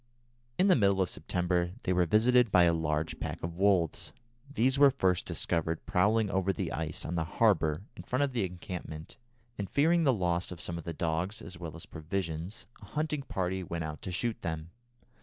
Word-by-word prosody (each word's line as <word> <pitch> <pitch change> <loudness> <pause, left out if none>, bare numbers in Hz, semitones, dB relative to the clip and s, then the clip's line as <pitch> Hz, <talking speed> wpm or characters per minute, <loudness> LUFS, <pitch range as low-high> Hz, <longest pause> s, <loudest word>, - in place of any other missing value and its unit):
In 185 - +4
the 190 - +6
middle 100 -4 +3
of 95 - +1
September 90 0 -1
they 90 - +1
were 90 -1 +2
visited 120 +4 +4
by 90 -1 +6
a 85 -1 +4
large 80 -1 -1
pack - - -5
of 85 0 -4
wolves. 95 -5 +2 0.4
These 130 +1 +2
were 140 -1 +8
first 95 -10 +1
discovered 80 -1 -1
prowling 105 +3 +2
over 95 0 +1
the 95 - -3
ice 80 0 -3
on 85 - -3
the 85 -2 0
harbour 85 -3 +2
in - - -8
front 130 +3 0
of 140 -2 -1
the 115 -4 +1
encampment, 85 -3 -7 0.4
and, 100 -2 -3
fearing 165 +4 +3
the 140 - +5
loss 90 -6 0
of 90 - -7
some 85 +2 -3
of 80 - -10
the 85 - -3
dogs, 85 +6 -1
as 90 -3 -8
well 85 -3 -6
as 85 - -9
provisions, 85 +4 -4 0.2
a - - -10
hunting 150 -1 -2
party 95 -7 -2
went 85 -1 -4
out 80 -1 -6
to 90 - -5
shoot 115 +5 -2
them. 80 -2 -4
90 Hz, 200 wpm, -30 LUFS, 85-110 Hz, 0.4 s, were